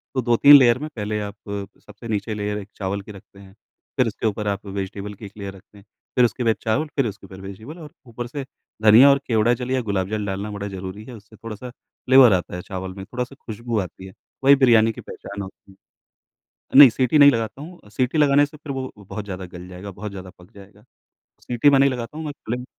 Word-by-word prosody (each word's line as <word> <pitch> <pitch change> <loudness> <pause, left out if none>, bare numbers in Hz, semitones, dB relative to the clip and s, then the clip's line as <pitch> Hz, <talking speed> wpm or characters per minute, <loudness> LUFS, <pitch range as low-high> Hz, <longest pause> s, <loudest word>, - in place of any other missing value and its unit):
तो 130 - +1
2-3 125 +4 +7
लेयर 125 -2 +4
में 155 - -5
पहले 105 -1 -3
आप 105 0 -6 0.5
सबसे 105 +3 -12
नीचे 110 0 -2
लेयर 105 0 -3
एक 100 -1 -8
चावल 100 0 -3
की 105 - -12
रखते 100 0 -15
हैं, 95 -1 -15 0.4
फिर 130 - +3
उसके 110 +1 -2
ऊपर 105 0 -3
आप 100 +1 -3
वेजिटेबल 100 +1 -5
की 105 +2 -11
एक 100 - -10
लेयर 100 -1 -6
रखते 100 +2 -19
हैं। 100 - -17 0.3
फिर 125 - +5
उसके 120 +1 -2
बाद 115 -1 +2
चावल 135 +8 0
फिर 135 -4 +1
उसके 100 -1 -8
ऊपर 95 0 -12
वेजिटेबल 110 - -9
और 150 -2 -11 0.2
ऊपर 120 +1 -6
से 135 +2 -6 0.4
धनिया 115 +6 +8
और 140 - +4
केवड़ा 115 0 +3
जल 125 +1 -4
या 130 -1 +1
गुलाब 100 -4 -2
जल 105 -1 -2
डालना 100 +1 -4
बड़ा 100 0 -5
ज़रूरी 95 +2 -7
है। 130 - -10
उससे 105 0 -16
थोड़ा-सा 115 +3 -8
फ्लेवर 130 -1 +3
आता 90 -1 -2
है 90 - -5
चावल 95 0 -6
में, 95 - -6
थोड़ा-सा 125 +4 -5
खुशबू 115 0 -3
आती 95 0 -7
है। 95 - -13 0.3
वही 140 +1 +7
बिरयानी 115 -4 +4
की - - -10
पहचान 100 0 -9
होती 95 0 -11
है। 95 - -21 1.0
नहीं, 140 -3 +11
सीटी 130 +6 +1
नहीं 145 0 +9
लगाता 115 +3 -3
हूँ। 175 +3 -11
अ, - - -17
सीटी 125 +8 -1
लगाने 145 0 +4
से 150 +1 -15
फिर 145 -1 -7
वो 130 -1 -4
अ, 105 -4 -17
बहुत 105 +2 -7
ज़्यादा 95 -2 -6
गल 90 +1 -11
जाएगा, 90 +2 -9
बहुत 100 +2 -7
ज़्यादा 95 -1 -9
पक 90 +2 -18
जाएगा। 100 0 -16 0.6
सीटी 125 +4 +2
मैं 140 -1 +4
नहीं 140 - +5
लगाता 125 +3 -6
हूँ, 160 - -5
मैं 150 - -4
क्लिंग 125 +2 -4
110 Hz, 235 wpm, -22 LUFS, 100-125 Hz, 1.0 s, नहीं